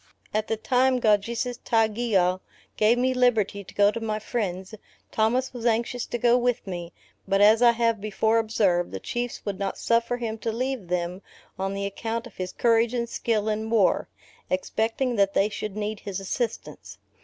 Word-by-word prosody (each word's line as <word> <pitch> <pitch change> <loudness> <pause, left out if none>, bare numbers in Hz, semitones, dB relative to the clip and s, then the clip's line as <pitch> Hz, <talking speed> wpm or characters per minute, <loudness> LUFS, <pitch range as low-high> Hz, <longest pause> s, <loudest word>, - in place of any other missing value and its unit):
At 215 +1 0
the 225 - -1
time 255 +3 +2
Kaujisestaugeau 220 -3 +1 0.4
gave 220 +3 +3
me 255 +1 +2
my 250 - -4
liberty 215 -5 +2
to - - -14
go 205 0 +5
to 230 - -5
my 220 -2 -2
friends, 200 -4 -3 0.4
Thomas 245 +5 +1
was 240 -1 -2
anxious 235 +1 0
to - - -3
go 240 +1 +4
with 245 -1 0
me; 175 -3 -6 0.4
but 195 0 +2
as 215 +3 +6
I 240 -1 +6
have 230 -2 +1
before 220 +2 +1
observed, 200 -6 +1
the 95 - -6
Chiefs 240 - -4
would 200 -2 -3
not 195 -1 -2
suffer 235 +1 +1
him 225 -2 -4
to 225 - -2
leave 250 -3 -3
them 180 +1 -2 0.4
on 195 +1 -2
the 200 0 -2
account 225 +4 -3
of 240 - -13
his 185 -1 -4
courage 230 0 +2
and 235 -1 -1
skill 220 -2 -1
in 220 +1 -1
war: 220 -4 +2 0.4
expecting 225 +6 -1
that 200 0 +2
they 200 - +3
should 210 -1 -5
need 210 0 -3
his 200 -2 -5
assistance. 225 +5 -4
220 Hz, 180 wpm, -25 LUFS, 200-235 Hz, 0.4 s, as